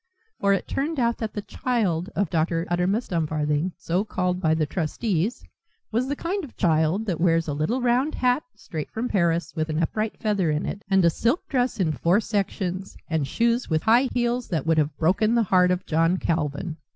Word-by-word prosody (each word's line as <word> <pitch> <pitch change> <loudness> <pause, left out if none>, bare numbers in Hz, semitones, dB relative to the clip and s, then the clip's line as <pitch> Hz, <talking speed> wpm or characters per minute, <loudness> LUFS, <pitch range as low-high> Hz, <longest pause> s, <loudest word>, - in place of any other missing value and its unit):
For 200 - +2
it 195 - -1
turned 295 +2 -2
out 235 -1 +1
that 220 -2 -3
the 205 - -4
"child" 200 -10 -1
of 200 -5 0
Dr. 165 +1 0
Uttermust 190 +7 0
Dumfarthing, 155 0 0
so 180 +4 -1
called 180 -3 -1
by 160 -2 +3
the 160 -1 +1
trustees, 180 - -1 0.5
was 240 +4 0
the 285 - -1
kind 370 +6 -3
of 280 - -11
child 165 +3 +2
that 175 -6 -2
wears 165 -2 +3
a 150 - -1
little 215 - -1
round 250 +5 +2
hat, 250 +2 +2
straight 155 -4 -6
from 230 +3 -3
Paris, 170 -6 +1
with 155 0 -1
an 155 - -1
upright 215 +6 -2
feather 200 -6 0
in 150 0 0
it, 200 - -4
and 190 -2 +4
a 170 - +5
silk 240 - 0
dress 250 -4 0
in 170 -5 +2
four 170 +6 +2
sections, 195 -3 -3
and 160 -4 0
shoes 235 - +1
with 160 -1 +1
high 240 +4 +4
heels 240 0 0
that 165 -4 -2
would 160 -1 +3
have 150 -1 -1
broken 205 +7 +2
the 235 - +4
heart 180 -2 +4
of 180 0 0
John 165 +3 +2
Calvin. 160 0 -2
185 Hz, 200 wpm, -25 LUFS, 160-230 Hz, 0.5 s, a